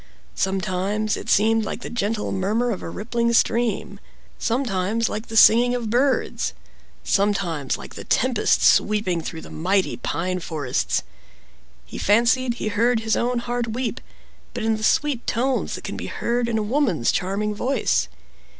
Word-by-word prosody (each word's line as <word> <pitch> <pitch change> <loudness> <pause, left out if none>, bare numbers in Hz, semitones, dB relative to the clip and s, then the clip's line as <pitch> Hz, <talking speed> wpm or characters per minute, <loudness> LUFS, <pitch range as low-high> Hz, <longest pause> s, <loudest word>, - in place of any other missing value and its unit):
Sometimes 195 +2 -1
it - - -7
seemed 225 +2 +3
like 215 - -5
the - - -6
gentle 215 -2 -2
murmur 215 +6 0
of 195 - -4
a - - -6
rippling 235 +5 -1
stream, 235 0 +1 0.4
sometimes 225 -3 0
like 215 +2 -5
the 225 - -3
singing 245 +3 +6
of 230 -3 -3
birds, 260 +3 +1 0.5
sometimes 190 -8 0
like - - -11
the - - -8
tempest 250 -3 +2
sweeping 205 -5 +3
through 160 0 -6
the - - -12
mighty 190 +4 0
pine 185 +2 -2
forests, 135 - -2 0.8
he - - -8
fancied 240 +3 +3
he 215 - -3
heard 225 +3 +2
his 220 0 +1
own 245 +1 0
heart 240 -1 -2
weep, 245 0 -3 0.5
but - - -3
in 225 0 +2
the 215 - -6
sweet 290 -1 +1
tones 255 +3 0
that - - -9
can - - -5
be - - -5
heard 240 0 -1
in 225 - 0
a 215 - 0
woman's 215 - +1
charming 200 +3 -1
voice. 245 - 0
220 Hz, 160 wpm, -23 LUFS, 195-240 Hz, 0.8 s, singing